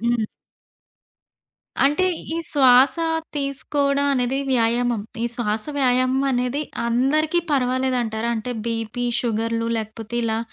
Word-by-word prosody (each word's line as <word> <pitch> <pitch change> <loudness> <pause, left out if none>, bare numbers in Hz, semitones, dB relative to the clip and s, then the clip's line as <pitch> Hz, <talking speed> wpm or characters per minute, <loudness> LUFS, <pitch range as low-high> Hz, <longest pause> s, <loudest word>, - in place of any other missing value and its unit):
హ్మ్. 235 -1 +1 1.6
అంటే, 295 +7 +3 0.3
ఈ - - -2
శ్వాస 260 -2 +5 0.4
తీసుకోవడం 280 0 0
అనేది 255 +1 0
వ్యాయామం. 240 -1 +1 0.2
ఈ - - +1
శ్వాస 215 -2 -1
వ్యాయామం 255 0 +2
అనేది 250 +3 0 0.2
అందరికీ 295 +8 +2
పర్వాలేదంటారా? 250 -4 0
అంటే 220 +3 -4 0.2
బీపీ, 230 +1 -2 0.2
షుగర్లు 230 0 -1
లేకపోతే 220 +1 -5
ఇలా 220 -1 0
245 Hz, 105 wpm, -22 LUFS, 230-270 Hz, 1.6 s, శ్వాస